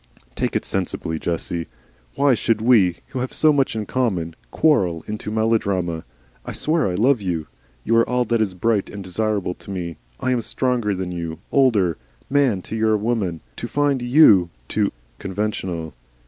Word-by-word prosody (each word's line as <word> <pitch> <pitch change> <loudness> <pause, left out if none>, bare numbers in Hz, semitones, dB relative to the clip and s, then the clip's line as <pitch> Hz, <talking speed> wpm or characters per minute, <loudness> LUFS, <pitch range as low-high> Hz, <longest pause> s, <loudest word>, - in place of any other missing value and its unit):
"Take - - -1
it - - 0
sensibly, 80 -1 -2
Jessie. 85 0 -3 0.5
Why 140 -1 +4
should 115 -1 +1
we, 110 -7 +4
who 130 - -4
have 125 +1 -3
so 155 -1 +4
much 135 -4 +1
in 110 -1 -2
common, 95 -10 -1
quarrel 90 - +2
into 105 0 -4
melodrama? 100 -7 0 0.4
I - - -6
swear 155 -3 +1
I 90 - -1
love 120 +4 +3
you. 85 -5 -2 0.4
You 115 - +2
are 115 - +3
all 125 0 +1
that 115 0 +1
is 100 -4 -1
bright 105 +2 +1
and 100 -1 -7
desirable 100 0 -1
to - - -15
me. 85 -5 -4 0.2
I 130 - 0
am 125 -2 +1
stronger 120 -4 0
than 90 -1 -4
you, 85 -2 -4
older; 105 - +3 0.3
man 130 -10 +2
to - - -6
your 110 -1 +2
woman. 105 -7 -1 0.2
To - - -4
find 145 -3 +1
YOU 120 - +6 0.2
too - - 0 0.3
conventional!" 95 -5 -3
105 Hz, 170 wpm, -22 LUFS, 90-125 Hz, 0.5 s, YOU